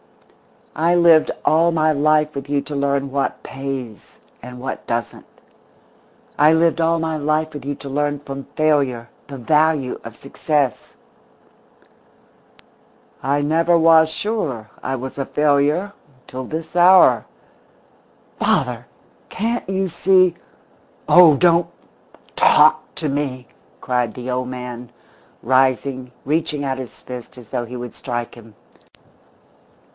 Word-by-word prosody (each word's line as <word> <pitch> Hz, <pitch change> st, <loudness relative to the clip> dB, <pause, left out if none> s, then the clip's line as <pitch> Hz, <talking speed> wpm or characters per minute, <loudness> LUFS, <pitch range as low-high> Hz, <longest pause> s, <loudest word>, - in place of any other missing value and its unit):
_" -, -, -34 dB
"I 170 Hz, +2 st, +1 dB
lived 170 Hz, -2 st, +5 dB, 0.2 s
all 165 Hz, +2 st, +3 dB
my 155 Hz, -1 st, +2 dB
life 150 Hz, +1 st, +2 dB
with 140 Hz, 0 st, -7 dB
you 145 Hz, -1 st, +1 dB
to 145 Hz, +1 st, -7 dB
learn 140 Hz, -1 st, -1 dB
what 140 Hz, 0 st, -2 dB
pays, 135 Hz, -5 st, -7 dB, 0.2 s
and 125 Hz, +1 st, -10 dB
what 130 Hz, +1 st, -6 dB
doesn't. 115 Hz, -2 st, -4 dB, 1.1 s
I 150 Hz, +2 st, +6 dB
lived 165 Hz, +1 st, +2 dB
all 165 Hz, +1 st, +2 dB
my 160 Hz, -1 st, -2 dB
life 155 Hz, +1 st, -1 dB
with 145 Hz, -3 st, -8 dB
you 145 Hz, 0 st, -3 dB
to 140 Hz, -, -10 dB
learn 145 Hz, +1 st, -1 dB
from 135 Hz, -1 st, -8 dB
failure 140 Hz, -7 st, 0 dB, 0.2 s
the 140 Hz, -, -8 dB
value 150 Hz, +1 st, +1 dB
of 115 Hz, -1 st, -10 dB
success." 140 Hz, 0 st, -2 dB, 2.3 s
"I 140 Hz, +2 st, 0 dB
never 165 Hz, +3 st, +2 dB
was 160 Hz, -1 st, +5 dB
sure 160 Hz, -, -3 dB
I 135 Hz, -, -3 dB
was 130 Hz, +1 st, -7 dB
a 135 Hz, -, -2 dB
failure 150 Hz, +8 st, +1 dB, 0.3 s
until 130 Hz, +1 st, -8 dB
this 160 Hz, +4 st, -7 dB
hour." 180 Hz, +1 st, +6 dB, 1.1 s
"Father! -, -, 0 dB, 0.4 s
Can't 230 Hz, -1 st, -3 dB
you 190 Hz, 0 st, -1 dB
see 185 Hz, 0 st, +3 dB, 0.4 s
" -, -, -34 dB
"Oh, 165 Hz, -5 st, +8 dB
don't 170 Hz, 0 st, +3 dB, 0.7 s
talk -, -, +5 dB
to 155 Hz, -, -3 dB
me!" 135 Hz, -3 st, -3 dB, 0.3 s
cried 125 Hz, -4 st, -1 dB
the 125 Hz, 0 st, -5 dB
old 125 Hz, 0 st, -2 dB
man, 125 Hz, -1 st, -7 dB, 0.5 s
rising, 130 Hz, 0 st, +1 dB
reaching 150 Hz, -1 st, -1 dB
out 135 Hz, -1 st, -3 dB
his 130 Hz, -3 st, -10 dB
fist 125 Hz, 0 st, -10 dB
as 120 Hz, -3 st, -14 dB
though 125 Hz, -2 st, -3 dB
he 125 Hz, +2 st, -9 dB
would 120 Hz, -1 st, -7 dB
strike 120 Hz, -2 st, -5 dB
him. 115 Hz, -2 st, -16 dB
145 Hz, 130 wpm, -20 LUFS, 130-160 Hz, 2.3 s, Oh